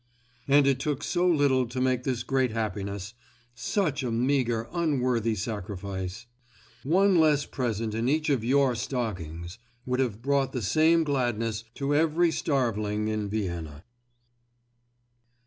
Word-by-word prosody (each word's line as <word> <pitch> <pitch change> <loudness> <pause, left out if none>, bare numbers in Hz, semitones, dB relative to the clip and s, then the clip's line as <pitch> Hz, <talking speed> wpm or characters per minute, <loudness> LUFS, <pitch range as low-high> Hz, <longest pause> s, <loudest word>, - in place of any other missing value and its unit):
And 140 0 +5
it 135 -2 +2
took 145 0 -2
so 180 0 +1
little 140 -6 +3
to 125 +2 -5
make 130 -1 +1
this 125 -3 -1
great 130 -1 +1
happiness—such 115 - -4
a 125 - -2
meagre, 120 -1 +1
unworthy 125 -9 +1
sacrifice. 100 0 -5 0.6
One 185 - +3
less 150 -2 +3
present 115 -4 -2
in 115 +3 0
each 155 +2 +1
of 130 -6 +1
your 135 +1 +3
stockings 95 - -4 0.3
would 125 0 -1
have 115 -4 -1
brought 140 0 +1
the 125 - -3
same 160 +4 +4
gladness 115 -6 -1
to 140 +1 -1
every 165 +3 +3
starveling 110 -8 -1
in 105 -1 -2
Vienna. 85 -7 -4
125 Hz, 130 wpm, -27 LUFS, 110-140 Hz, 0.6 s, And